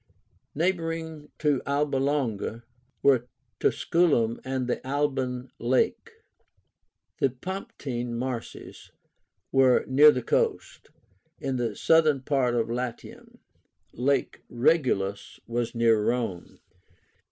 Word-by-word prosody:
Neighboring 165 -2 -2
to 150 -3 +1
Alba 140 0 0
Longa 125 -5 -1 0.4
were 130 -3 +4 0.3
Tusculum 140 -10 +2
and 130 -1 -2
the 125 - -2
Alban 130 -2 -2
Lake. 125 +2 0 1.1
The 135 - +3
Pomptine 125 -5 -5
Marshes 125 -1 -6 0.6
were 130 -2 +4
near 145 +3 +7
the 125 -4 +1
coast, - - -1 0.5
in 135 -1 -2
the 115 -4 -2
southern 155 -2 +3
part 130 -3 +1
of 115 - +1
Latium. 120 0 -6 0.5
Lake 140 +4 0
Regillus 120 -7 0
was 120 0 -3
near 115 -2 +3
Rome. 115 -7 -2
130 Hz, 95 wpm, -26 LUFS, 120-145 Hz, 1.1 s, near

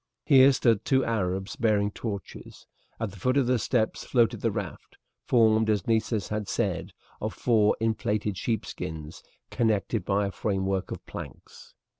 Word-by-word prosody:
Here 135 -2 +7
stood 115 -5 +2
two 130 -1 +2
Arabs 95 -3 -2
bearing 105 -3 +1
torches. 100 -4 -7 0.3
At 110 -3 -3
the 100 - -13
foot 130 +8 +1
of 140 - +3
the 125 0 +2
steps 110 -1 0
floated 120 -3 +1
the - - +2
raft, - - -6 0.3
formed, 110 -2 +4
as 105 -4 +1
Nessus 110 -3 0
had 105 -1 -3
said, - - -2 0.3
of 110 0 -3
four 110 -4 +3
inflated 105 -2 -1
sheepskins 80 -7 -4 0.3
connected 110 -2 0
by 100 +2 +1
a 100 - -3
framework 95 -1 -1
of - - -7
planks. - - -10
110 Hz, 150 wpm, -27 LUFS, 100-115 Hz, 0.3 s, Here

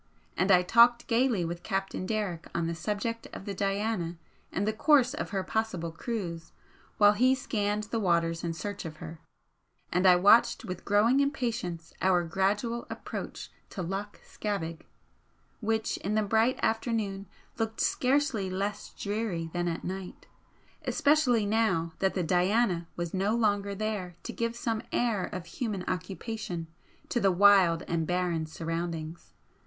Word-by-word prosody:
And 185 - +1
I 180 -2 +6
talked 235 +5 +5
gaily 230 -6 +2
with 170 +1 -4
Captain 195 -2 -2
Derrick 200 -6 -2
on 170 - 0
the 165 - -1
subject 210 +6 -3
of - - -8
the 200 - -3
'Diana' 195 -3 -1 0.3
and 200 +3 -1
the 215 - +1
course 260 +2 +4
of - - -4
her 195 -2 -2
possible 185 -6 -2
cruise, 170 -3 -5 0.4
while 205 -1 +7
he 255 +5 +4
scanned 210 -4 -1
the 225 +2 -2
waters 170 -4 +1
in 170 -1 -1
search 200 +5 -5
of 160 -3 -7
her, 160 +1 -8 0.7
and 180 +2 +3
I 180 - +8
watched 225 +6 +5
with 185 -1 -6
growing 215 +6 +4
impatience 230 - -2
our 185 -2 +3
gradual 200 +7 -1
approach - - -6 0.2
to 185 - -5
Loch 195 +4 -4
Scavaig, 165 -6 -4 0.7
which 220 0 -1
in 205 +3 -2
the 215 - +3
bright 225 +5 +2
afternoon 220 -3 -1 0.3
looked 225 0 -2
scarcely 260 -7 +1
less 200 +2 -3
dreary 200 -6 -2
than 175 0 -1
at 165 -1 -3
night, 190 0 -6 0.6
especially 280 -7 +3
now 200 -7 +1
that 190 0 +1
the 185 - 0
'Diana' 180 +1 +2
was 175 -1 -4
no 195 +3 +1
longer 205 -3 +1
there 200 -4 -3
to - - -5
give 230 0 -2
some 230 -2 -2
air 230 -6 +1
of 185 -4 -6
human 200 +1 -3
occupation 185 -1 -4 0.4
to 240 - +1
the 195 -3 +3
wild 185 -3 +5
and 165 -2 -1
barren 175 -3 0
surroundings. 165 0 -5
200 Hz, 150 wpm, -29 LUFS, 175-225 Hz, 0.7 s, I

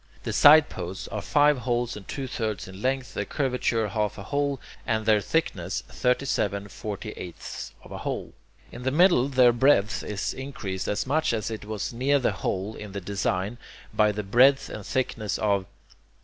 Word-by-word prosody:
The - - -3
sideposts 120 - +5
are 105 - -3
five 145 +2 +3
holes 120 0 -1
and 105 -3 -10
two 135 - -4
thirds 110 -5 -3
in 95 +1 -10
length, 130 +1 -1
their - - -1
curvature 125 -5 0
half 105 +1 -1
a 100 - -7
hole, 140 +4 -1 0.2
and 110 -1 -1
their 110 -1 +4
thickness 160 +9 -1
thirty 125 +2 0
seven 100 -5 -1
forty 105 +1 -6
eighths 90 -4 -7
of - - -14
a - - -6
hole. - - -4 0.4
In 120 - -9
the 130 - 0
middle 155 -3 +4
their 130 -3 +5
breadth 120 -4 +3
is 100 -2 -3
increased 105 -9 -5
as 105 - -1
much 155 +1 +1
as 110 0 -2
it 110 -2 -6
was 105 +1 -4
near 135 +4 +2
the 125 -5 +1
hole 95 +1 -3
in 105 -2 -8
the 100 - -3
design, 100 +3 -2 0.3
by 105 -1 +4
the 105 0 -4
breadth 130 +7 +4
and 105 - -7
thickness 115 -3 -1
of... 100 -3 +1
110 Hz, 180 wpm, -26 LUFS, 100-130 Hz, 0.4 s, sideposts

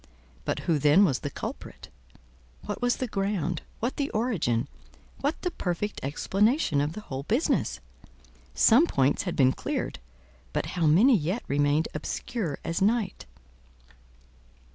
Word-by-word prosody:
But - - -1
who 165 -4 +1
then 150 +8 +6
was 135 -8 +1
the 145 - -4
culprit? 85 - -7 0.8
What - - -4
was 245 0 +2
the 255 - -2
ground—what 195 - -3
the 285 -1 -1
origin—what 215 - -3
the 360 - 0
perfect 195 - -3
explanation 195 - +1
of 145 +2 -1
the 215 - -7
whole 135 -9 -5
business? 230 - 0 0.8
Some 265 +10 +6
points 135 - +2
had - - -4
been 130 -2 +4
cleared, - - -3 0.5
but - - -1
how 170 -3 +1
many 215 - +6
yet 180 +6 -1
remained 145 +2 +2
obscure 165 - -3
as 165 - -2
night! 210 -1 0
180 Hz, 130 wpm, -27 LUFS, 145-230 Hz, 0.8 s, then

